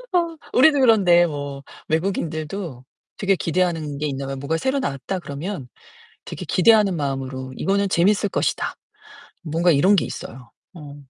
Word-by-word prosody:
어 335 -2 +1 0.2
우리도 285 +2 +5
그런데 185 -8 +5
뭐 145 -2 -6 0.3
외국인들도 160 -4 -3 0.3
되게 195 -3 +2
기대하는 165 -5 -1
게 150 - -2
있나 135 -1 -4
봐요. 135 - -4
뭐가 140 +4 -2
"새로 265 - 0
나왔다." 185 - -3
그러면 145 -1 -6 0.6
되게 - - -7
기대하는 205 -2 +4
마음으로 135 -2 -4
'이거는 200 +1 0
재밌을 200 +4 +2
것이다.' - - -1 0.7
뭔가 170 +2 +2
이런 185 +8 +4
게 180 - +1
있어요. 125 -1 -9 0.2
어. 145 -3 -10
170 Hz, 335 characters per minute, -22 LUFS, 140-200 Hz, 0.7 s, 우리도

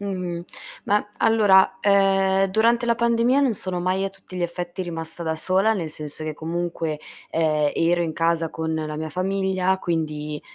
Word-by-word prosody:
Mh-mh. 180 -4 -4 0.4
Ma 205 0 +1
allora, 200 -4 +4
ehm, 195 -1 +3
durante 230 +5 +2
la 235 - +3
pandemia 235 +3 +2
non 265 -5 +2
sono 185 -3 -4
mai 185 +2 0
a 195 - -1
tutti 195 -1 -14
gli 180 - -3
effetti 175 +1 -4
rimasta 165 -1 -6
da 160 -1 -1
sola, 190 +7 +2
nel 170 -7 -3
senso 150 0 -6
che 155 0 -3
comunque, 165 -1 -3 0.3
ehm, 155 -2 +1
ero 175 +1 +2
in 165 -2 -1
casa 165 0 +1
con 160 0 -3
la 155 -1 -3
mia 155 0 -4
famiglia, 190 +1 0
quindi 150 -4 -3
180 Hz, 170 wpm, -23 LUFS, 160-195 Hz, 0.4 s, allora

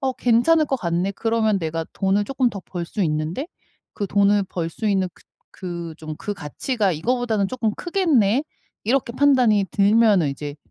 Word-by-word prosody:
어 265 -2 0
괜찮을 255 +7 +3
것 270 - 0
같네. 175 +2 -1
그러면 225 -2 +1
내가 165 -1 -3
돈을 200 +1 +1
쪼끔 260 0 0
더 200 - -7
벌 175 -1 -6
수 200 +4 -3
있는데 155 - -2 0.5
그 205 - -3
돈을 200 +1 +3
벌 170 -2 -2
수 215 +6 -5
있는 195 -3 +1
그 - - -22 0.3
그 170 -3 -6
좀 155 -1 -7
그 205 - -4
가치가 200 - -2
이거보다는 220 +4 0
쪼끔 225 -3 -1
크겠네.' 290 - +2 0.4
이렇게 240 +1 0
판단이 250 -7 +3
들면은 205 -4 +4
이제 145 +1 -6
205 Hz, 320 characters per minute, -22 LUFS, 175-245 Hz, 0.5 s, 들면은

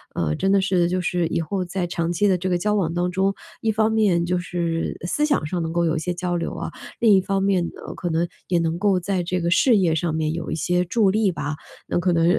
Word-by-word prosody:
呃， 75 -2 0
真 195 - +1
的 200 - +5
是 180 -2 +2
就 185 +1 0
是 175 0 0
以 165 - -1
后 185 +4 -2
在 180 0 -2
长 170 0 -2
期 190 +4 +2
的 190 - +4
这 185 +2 -2
个 180 - +2
交 210 +4 0
往 170 -5 0
当 175 +1 0
中， 190 +2 +1 0.3
一 220 - +1
方 220 0 +2
面 200 -6 +2
就 180 +1 0
是 170 -1 -2
思 295 +11 +1
想 285 - +1
上 170 +3 -2
能 160 - -3
够 170 0 +1
有 160 - +1
一 160 - 0
些 180 +2 -2
交 175 0 -2
流 170 - -2
啊， - - -4 0.3
另 225 -3 +5
一 190 - +4
方 195 +1 -1
面 195 -3 +2
呢， - - -9
可 175 - -3
能 165 +2 +1 0.2
也 175 -2 +2
能 165 0 0
够 195 -2 +2
在 185 0 -1
这 180 +1 -1
个 170 0 0
事 230 +5 +5
业 180 -5 +2
上 160 0 -1
面 155 -1 0
有 165 -1 -4
一 - - -1
些 180 +3 +1
助 205 +1 +2
力 210 -1 +2
吧。 155 -3 -4 0.3
那 - - -1
可 180 0 +1
能 165 0 +3
180 Hz, 290 characters per minute, -23 LUFS, 170-195 Hz, 0.3 s, 的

